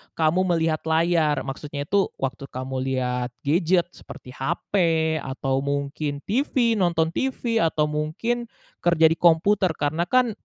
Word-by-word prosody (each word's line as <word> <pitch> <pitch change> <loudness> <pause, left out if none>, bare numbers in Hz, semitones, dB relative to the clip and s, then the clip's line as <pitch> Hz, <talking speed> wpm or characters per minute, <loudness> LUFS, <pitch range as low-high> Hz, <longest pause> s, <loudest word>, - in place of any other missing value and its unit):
kamu 170 +4 +2
melihat 160 -1 +1
layar? 160 -3 +2
Maksudnya 145 +1 -5
itu 195 +6 +1
waktu 135 +1 -4
kamu 130 +1 -5
lihat 125 -1 -2
gadget 175 +3 +2
seperti 125 - -12
hape 160 +3 0
atau 135 -1 -2
mungkin 140 +1 -3
TV 235 -1 +1
nonton 165 -3 +1
TV 240 +1 -1
atau 155 -4 +1
mungkin, 230 +11 -2 0.3
kerja 165 -2 +4
di 165 - 0
komputer 175 +1 +3
karena 155 +4 -1
kan, 250 +2 +3
160 Hz, 130 wpm, -24 LUFS, 140-180 Hz, 0.3 s, kerja